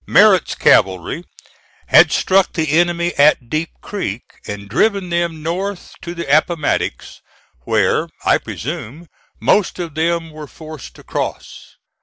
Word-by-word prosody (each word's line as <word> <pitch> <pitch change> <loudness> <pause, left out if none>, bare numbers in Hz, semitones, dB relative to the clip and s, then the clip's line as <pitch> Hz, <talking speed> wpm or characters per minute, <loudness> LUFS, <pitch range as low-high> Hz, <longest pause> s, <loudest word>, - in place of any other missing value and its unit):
Merritt's - - +4
cavalry 95 - +2 0.6
had - - +6
struck 190 0 +2
the 160 -4 -1
enemy 175 +1 +1
at 140 -5 +4
Deep 155 +2 -1
Creek, 125 - -4 0.2
and 100 0 -6
driven 195 - +1
them 170 -2 -1
north 185 +4 -4
to 170 0 -7
the 170 - -4
Appomattox, 155 -1 -1 0.4
where, - - +1 0.2
I - - +4
presume, 155 +3 -7 0.3
most 205 -3 +2
of 170 -4 -5
them 165 +1 -1
were 155 -1 -9
forced 155 -3 -11
to - - -15
cross. - - -6
165 Hz, 130 wpm, -18 LUFS, 150-175 Hz, 0.6 s, had